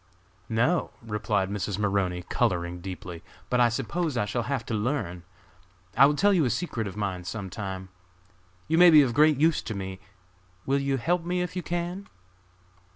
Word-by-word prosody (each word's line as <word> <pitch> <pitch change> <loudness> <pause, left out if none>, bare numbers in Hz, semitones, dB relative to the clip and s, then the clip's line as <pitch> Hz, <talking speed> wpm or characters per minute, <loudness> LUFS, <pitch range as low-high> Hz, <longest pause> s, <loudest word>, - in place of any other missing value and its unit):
"No!" 125 +10 +1
replied 105 -3 -1
Mrs. 100 -1 -2
Maroney, 100 -4 0
coloring 85 0 -1
deeply; 90 -2 -7 0.3
"but 125 - +2
I 120 -1 +5
suppose 135 +5 -2
I 105 - +1
shall 110 +4 -2
have 135 -5 -1
to 120 - -4
learn! 105 -6 -2 0.7
I 140 - +8
will 145 - +1
tell 200 +6 +4
you 175 -5 +3
a 130 - +1
secret 115 - -2
of 100 - -8
mine 95 -3 -3
some 95 +2 -5
time. 95 -1 -6 0.8
You 160 +2 +2
may 180 0 +9
be 155 -3 +8
of 125 -3 -1
great 150 +2 +5
use 160 +2 +3
to 110 - -5
me, 95 -1 -5 0.7
will 140 +1 +2
you 140 -1 0
help 170 +7 0
me 180 +1 -1
if 180 +1 -6
you 180 - -1
can?" 175 +3 -4
115 Hz, 180 wpm, -27 LUFS, 95-155 Hz, 0.8 s, may